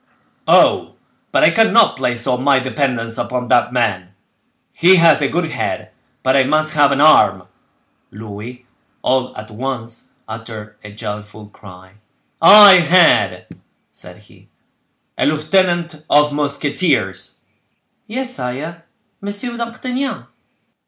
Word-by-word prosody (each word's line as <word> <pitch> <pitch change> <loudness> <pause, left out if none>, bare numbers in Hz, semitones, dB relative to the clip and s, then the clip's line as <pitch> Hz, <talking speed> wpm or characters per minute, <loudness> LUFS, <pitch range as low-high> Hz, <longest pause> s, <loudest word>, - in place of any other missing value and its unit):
Oh! - - +3 0.4
but - - +1
I - - +5
cannot 225 -1 +3
place 120 -2 -3
all 125 -2 -1
my 140 +1 +2
dependence 130 -3 -2
upon 125 -1 -4
that 120 -1 +2
man; 95 -7 -2 0.6
he 180 +3 +4
has 165 -4 +4
a 140 - +1
good 165 +1 -3
head, - - -5 0.3
but 130 +1 +1
I 135 - +4
must 155 +3 0
have 145 -2 +3
an 140 - -1
arm!" 155 +1 +4 0.7
Louis, 110 +4 -11 0.4
all 130 0 -1
at 110 +1 -10
once, 120 0 -7
uttered 110 -1 -10
a 105 - -11
joyful 105 0 -9
cry. 95 -1 -17 0.4
"I 200 +2 +8
had," 160 - +2 0.5
said - - -15
he, - - -22 0.7
"a - - +1
lieutenant 170 +1 -1
of 150 0 +3
musketeers!" 140 - -2 0.7
"Yes, 255 +3 -4
sire—Monsieur 170 - -8
d'Artagnan." 250 +3 -5
135 Hz, 120 wpm, -17 LUFS, 115-170 Hz, 0.7 s, I